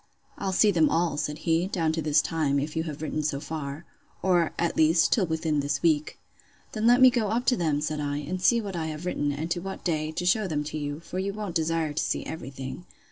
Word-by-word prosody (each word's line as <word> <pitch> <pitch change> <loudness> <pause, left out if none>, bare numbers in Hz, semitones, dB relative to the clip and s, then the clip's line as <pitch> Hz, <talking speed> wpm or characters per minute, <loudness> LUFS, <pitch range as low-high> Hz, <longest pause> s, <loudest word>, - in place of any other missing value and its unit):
I'll 195 - -2
see 205 +3 +4
them 165 -4 +3
all, 165 -2 +1
said 150 0 -2
he, 165 +2 +2
down 165 -5 0
to 160 0 -2
this 150 -1 +3
time, 150 -4 0
if 150 +3 -2
you 160 0 -1
have 155 -1 -6
written 155 0 -2
so 145 -2 -1
far:—Or, 160 +4 -2
at 170 - 0
least, 160 +1 +4
till 195 -6 +3
within 160 -2 0
this 145 0 -1
week.—Then 165 +7 -2
let 245 +2 +6
me 255 -1 +9
go 235 -4 0
up 235 +4 -1
to 250 - +4
them, 155 -6 0
said 155 0 -2
I, 145 -1 -2
and 170 +6 -4
see 235 +5 +4
what 200 -4 -5
I 160 -2 -2
have 155 +2 -6
written, 145 -5 -1
and 155 +4 -4
to 175 - +1
what 190 +2 -7
day, 155 -3 -1
to 180 - -3
shew 195 +3 +2
them 150 -4 -1
to 150 +1 -5
you; 145 +1 -4
for 180 +2 -5
you 195 +1 -2
won't 205 -3 -5
desire 165 -2 0
to 145 - 0
see - - -2
every 145 -5 -6
thing. 135 +5 -8
160 Hz, 245 wpm, -27 LUFS, 150-180 Hz, -, me